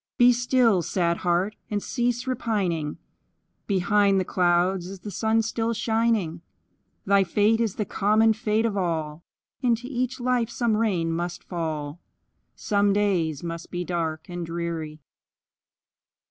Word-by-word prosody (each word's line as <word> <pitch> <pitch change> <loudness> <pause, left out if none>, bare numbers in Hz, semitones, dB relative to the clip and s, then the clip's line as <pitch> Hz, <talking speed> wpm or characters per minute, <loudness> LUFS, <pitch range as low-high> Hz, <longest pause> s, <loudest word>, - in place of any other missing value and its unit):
Be 245 0 +7
still, 240 -5 +3
sad 170 0 0
heart! 180 +4 0
and 205 -1 -2
cease 245 0 -1
repining; 195 - -1 0.7
Behind 200 0 +3
the 185 - -1
clouds 180 +1 +1
is 190 0 -9
the 210 - -7
sun 220 +2 +1
still 225 +1 -1
shining; 220 -7 0 0.6
Thy 200 0 +4
fate 210 +5 +2
is 220 -4 0
the 210 - -2
common 215 +3 +3
fate 220 0 0
of 220 -3 -1
all, 165 -4 -2 0.4
Into 240 -2 +1
each 255 -1 -2
life 245 -2 +1
some 235 -2 0
rain 190 -7 0
must 175 +1 -3
fall, 155 -3 -4 0.6
Some 205 -1 +1
days 180 -8 0
must 170 0 -6
be 180 0 -4
dark 165 -2 -3
and 175 -1 -5
dreary. 165 -2 -4
200 Hz, 135 wpm, -25 LUFS, 170-225 Hz, 0.7 s, Be